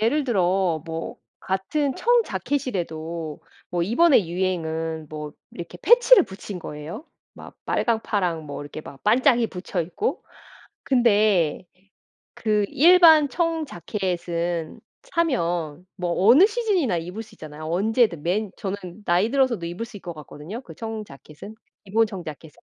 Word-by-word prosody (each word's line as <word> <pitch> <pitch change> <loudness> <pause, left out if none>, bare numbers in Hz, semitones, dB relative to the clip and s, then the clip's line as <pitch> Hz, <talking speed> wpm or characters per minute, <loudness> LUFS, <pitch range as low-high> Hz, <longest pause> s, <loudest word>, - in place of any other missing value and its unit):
예를 270 +7 +2
들어 185 - +1
뭐 165 0 -5 0.2
같은 260 +9 -1
청자켓이라도 170 - -1 0.3
뭐 175 -1 0
이번의 235 - +4
유행은 165 -3 -2
뭐 150 -1 -7 0.2
이렇게 170 -1 -8
패치를 485 -3 +7
붙인 190 0 -8
거예요. 160 - -7 0.3
막 - - -12
빨강, 230 -2 +1
파랑 175 -6 -1
뭐 145 0 -6
이렇게 145 +2 -8
막 140 - -12
반짝이 235 +1 +3
붙여 180 0 -4
있고. 185 - -3 0.6
근데 210 - +2 0.7
그 210 -2 +1
일반 320 -1 +7
청자켓은 180 - -2 0.2
사면 175 - -1
뭐 175 -2 -2
어느 280 - +8
시즌이나 410 - 0
입을 180 +7 -5
수 220 - -17
있잖아요. 155 0 -10
언제든 195 - +1
맨 200 +4 -1
저는 195 0 -3 0.3
나이 180 +6 +2
들어서도 260 -10 +1
입을 175 +7 -5
수 230 -2 -11
있을 - - -25
것 170 -1 -6
같거든요, 155 - -9
그 - - -12
청자켓은. 215 -4 -8 0.3
기본 220 +3 +2
청자켓은. 160 -6 -9
190 Hz, 285 characters per minute, -24 LUFS, 165-245 Hz, 0.7 s, 어느